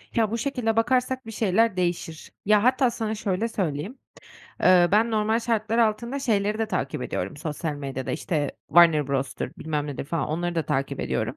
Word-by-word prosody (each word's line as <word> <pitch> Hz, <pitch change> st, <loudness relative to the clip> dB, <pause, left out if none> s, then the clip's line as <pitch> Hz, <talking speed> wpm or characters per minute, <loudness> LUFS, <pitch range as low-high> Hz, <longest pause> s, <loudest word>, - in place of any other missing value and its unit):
Ya, 220 Hz, -3 st, +2 dB
bu 230 Hz, -, -1 dB
şekilde 235 Hz, -3 st, -1 dB
bakarsak 255 Hz, +2 st, +1 dB
bir 225 Hz, -, -7 dB
şeyler 220 Hz, -1 st, +1 dB
değişir. 175 Hz, -2 st, -3 dB
Ya, 210 Hz, 0 st, +4 dB
hatta 255 Hz, 0 st, +3 dB
sana 220 Hz, -1 st, -3 dB
şöyle 210 Hz, +1 st, -1 dB
söyleyeyim: 190 Hz, -, -3 dB, 0.7 s
Eee, 180 Hz, -1 st, +6 dB
ben 225 Hz, +3 st, +4 dB
normal 220 Hz, +1 st, +1 dB
şartlar 225 Hz, -1 st, -1 dB
altında, 235 Hz, +4 st, +1 dB
şeyleri 215 Hz, -5 st, 0 dB
de 225 Hz, -, 0 dB
takip -, -, -2 dB
ediyorum -, -, -4 dB
sosyal 155 Hz, -1 st, -4 dB
medyada, 135 Hz, -2 st, -5 dB
işte 150 Hz, -2 st, -1 dB, 0.2 s
Warner 165 Hz, -3 st, +5 dB
Bros'dur, 135 Hz, -1 st, -2 dB
bilmem 150 Hz, -2 st, -2 dB
nedir, 140 Hz, -1 st, -5 dB
falan, 150 Hz, 0 st, -2 dB
onları 175 Hz, +3 st, -2 dB
da 165 Hz, -, +1 dB
takip 135 Hz, +1 st, -1 dB
ediyorum. -, -, -2 dB
210 Hz, 175 wpm, -25 LUFS, 160-230 Hz, 0.7 s, Eee